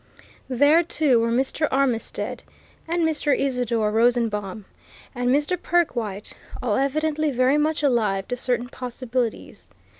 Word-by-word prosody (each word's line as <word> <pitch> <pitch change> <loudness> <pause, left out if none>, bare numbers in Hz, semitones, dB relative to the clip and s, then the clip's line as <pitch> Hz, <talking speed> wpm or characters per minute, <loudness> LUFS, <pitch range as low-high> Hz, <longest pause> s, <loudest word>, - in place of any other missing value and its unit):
There, 285 +6 +4
too, 305 -7 +2
were 230 0 +1
Mr. 265 +6 0
Armitstead 260 -4 -1 0.5
and 340 0 0
Mr. 300 -2 +1
Isidore 245 -5 0
Rosenbaum, 220 -4 0 0.5
and 245 -1 -1
Mr. 295 +7 +1
Perkwite, 235 - -1 0.3
all 215 -4 0
evidently 305 +3 0
very 260 +2 +2
much 305 0 0
alive 215 -8 +1
to 245 - -1
certain 245 0 -1
possibilities. 250 -2 -4
255 Hz, 120 wpm, -23 LUFS, 230-295 Hz, 0.5 s, There